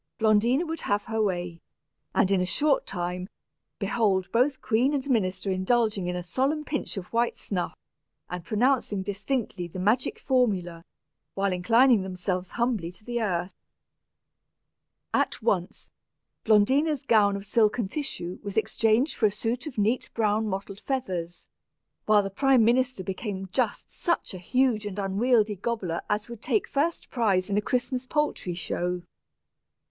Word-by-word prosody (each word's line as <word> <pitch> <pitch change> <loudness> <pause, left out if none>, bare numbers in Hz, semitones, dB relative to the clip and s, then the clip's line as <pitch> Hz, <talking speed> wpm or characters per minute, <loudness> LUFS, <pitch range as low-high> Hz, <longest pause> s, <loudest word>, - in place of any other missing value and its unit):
Blondina 225 +8 +3
would 325 0 -4
have 205 0 0
her 225 -1 -2
way; 175 -4 -2 0.5
and, 195 - +3
in 190 -2 +3
a - - +1
short 285 +8 +1
time, 180 0 -4 0.5
behold 195 -5 +1
both 260 +3 +2
queen 255 +6 +2
and 275 0 -2
minister 195 -6 0
indulging 200 0 +1
in 180 - -2
a 180 - -3
solemn 275 - -1
pinch 290 -7 -3
of 180 +2 -7
white 235 +1 +1
snuff, 180 -4 -3 0.5
and 180 -1 -6
pronouncing 215 0 +1
distinctly 200 -2 -3
the 170 - -9
magic 225 - +1
formula, 195 - 0 0.5
while 195 -1 +1
inclining 230 +5 +4
themselves 185 -1 -3
humbly 230 -8 0
to 180 +4 -18
the 240 -1 -2
earth! 180 -3 -1 1.6
At - - +1
once, 200 -6 -1 0.5
Blondina's 265 +7 +3
gown 205 -3 +4
of 200 0 -6
silken 215 +1 +2
tissue 190 - -4
was 205 0 -6
exchanged 225 +5 +2
for 220 - +3
a - - -1
suit 235 +7 -3
of 270 - -8
neat 220 +4 +1
brown 215 -1 +1
mottled 195 0 -4
feathers, 180 -11 -3 0.6
while 210 -1 +5
the 195 - -4
prime 260 +2 +4
minister 250 -3 +2
became 190 0 -4
just 235 0 -1
such 340 - -1
a 185 - -6
huge 235 +1 +1
and 200 -1 -6
unwieldy 210 +2 +2
gobbler 195 -5 -2
as 210 0 0
would 235 -2 -9
take 420 - 0
first 315 +5 -1
prize 200 -6 +1
in 200 - +1
a - - -2
Christmas 250 +2 -1
poultry 295 - -1
show! 175 +2 -2
210 Hz, 150 wpm, -27 LUFS, 190-245 Hz, 1.6 s, while